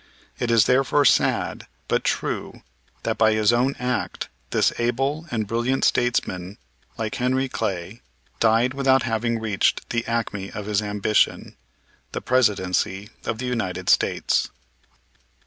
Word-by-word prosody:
It 120 - -1
is 115 -4 +5
therefore 135 +3 +3
sad, - - +2 0.2
but - - +1
true, - - -3 0.4
that - - -2
by 110 -1 +5
his 110 +1 +3
own 125 +3 +2
act 125 -1 -3 0.2
this - - +2
able 135 +7 -1
and 110 -3 -1
brilliant 120 +5 0
statesman, 100 -6 0 0.4
like 110 -1 -3
Henry 130 +2 0
Clay, 100 -3 -4 0.4
died 115 +3 +3
without 135 -1 +3
having 115 0 -1
reached 110 -3 0
the 115 -1 0
acme 105 -4 -2
of 105 -1 -5
his 105 0 0
ambition, 105 0 0 0.6
the - - -2
Presidency 105 -4 +1 0.2
of 110 - -2
the 125 - -4
United 95 -7 -2
States. - - +2
115 Hz, 130 wpm, -23 LUFS, 105-125 Hz, 0.6 s, is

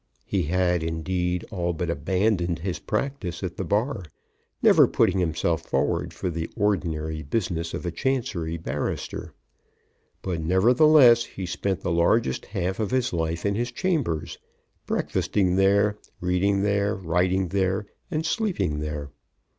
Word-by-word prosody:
He - - 0
had, 90 +1 +1
indeed, 90 +2 -2
all 90 -4 -1
but 85 +1 -2
abandoned 90 +2 0
his 90 +2 -4
practice 105 - -3
at 90 -2 -3
the - - -3
Bar, 105 - 0 0.6
never - - +6
putting 95 - +2
himself 85 -1 0
forward 65 -4 -1
for 90 - -3
the 80 0 -4
ordinary 80 -7 -1
business 85 0 -2
of - - -6
a 85 - -1
Chancery 90 - -1
barrister. 80 - -4 0.9
But, 90 -4 -2
nevertheless, 120 - +6
he 95 - -7
spent 90 +2 -2
the 90 - -2
largest 85 - +2
half 95 -1 -2
of 105 -3 0
his 130 -1 0
life 80 +1 -2
in 100 - +2
his 120 +4 -2
chambers, 85 - -1 0.5
breakfasting 95 -3 0
there, 100 +2 +3 0.2
reading 95 +2 +1
there, 100 0 +1
writing 90 +1 0
there, 95 +2 0 0.2
and 155 +1 -2
sleeping 160 - 0
there. 75 -2 -4
90 Hz, 140 wpm, -25 LUFS, 85-105 Hz, 0.9 s, never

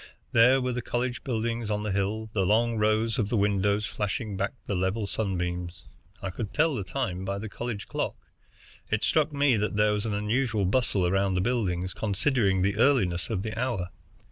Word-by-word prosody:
There 125 +3 +6
were 125 0 -1
the 125 - -2
college 125 +2 -2
buildings 115 -2 -2
on 105 0 -1
the 105 - -2
hill, 100 +3 -1
the 100 - +1
long 115 +4 +2
rows 110 +2 +2
of 105 -2 0
windows 100 -1 +2
flashing 105 +1 -3
back 100 +1 -1
the - - -2
level 95 +4 0
sunbeams. 90 -4 -3 0.4
I 95 - -2
could 105 +1 -5
tell 160 0 +3
the 105 - -2
time 90 +1 -3
by 100 +1 -2
the 110 +2 -5
college 115 -1 -5
clock. - - -2 0.7
It 110 - 0
struck 155 -1 +2
me 140 -4 +3
that 105 0 -1
there 105 0 +3
was 105 +2 -1
an 105 - -1
unusual 110 0 0
bustle 100 -2 +1
around 95 +1 +1
the - - +2
buildings, 95 -6 -1
considering 100 -2 +1
the 100 +1 +1
earliness 100 -10 +2
of 100 -4 -1
the 110 0 -4
hour. 115 -7 -1
105 Hz, 190 wpm, -27 LUFS, 95-115 Hz, 0.7 s, There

